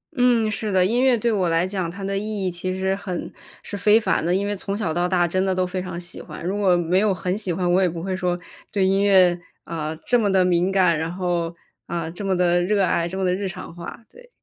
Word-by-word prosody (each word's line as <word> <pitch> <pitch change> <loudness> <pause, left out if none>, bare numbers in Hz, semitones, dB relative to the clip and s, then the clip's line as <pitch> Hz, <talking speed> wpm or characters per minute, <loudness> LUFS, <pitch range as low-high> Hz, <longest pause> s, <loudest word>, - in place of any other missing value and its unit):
嗯， 245 -4 +3
是 210 0 -3
的， 185 -1 +3
音 235 +6 +1
乐 260 -2 +4
对 235 +1 0
我 190 -5 +1
来 165 +2 +2
讲， 185 -2 -2
它 195 +3 -8
的 195 0 -2
意 205 -1 -3
义 185 - 0
其 185 +2 -3
实 190 0 0
很 190 -3 -5 0.3
是 - - -6
非 210 +3 +4
凡 215 - 0
的， 175 +2 +1
因 200 +1 0
为 205 0 -1
从 195 +1 -4
小 195 -7 -1
到 175 +2 +1
大 175 -2 +2
真 185 +3 0
的 190 -1 0
都 185 0 +1
非 180 +1 -3
常 180 -1 -5
喜 175 -1 -4
欢。 - - -9
如 190 +3 -1
果 190 -4 +3
没 175 +2 +2
有 210 -1 +2
很 180 +1 -2
喜 200 -3 -2
欢， 175 +1 0
我 185 +2 +4
也 185 - +3
不 165 0 -6
会 190 0 -2
说 180 -1 -1 0.3
对 195 -2 +1
音 195 +1 +2
乐， 185 -3 +5 0.2
啊， 160 -1 -4
这 245 - +3
么 205 -3 +1
地 190 -1 +4
敏 180 +1 +2
感， 180 -4 +3
然 165 +1 -2
后， 175 -2 -2 0.3
啊， 170 -1 -3
这 180 - -7
么 190 -2 0
地 175 0 +3
热 200 +2 +2
爱， 170 -2 +1
这 185 +2 -6
么 190 - 0
地 180 - +2
日 195 +1 -2
常 175 - -8
化。 175 +6 -9
对。 - - -17
185 Hz, 285 characters per minute, -23 LUFS, 175-200 Hz, 0.3 s, 乐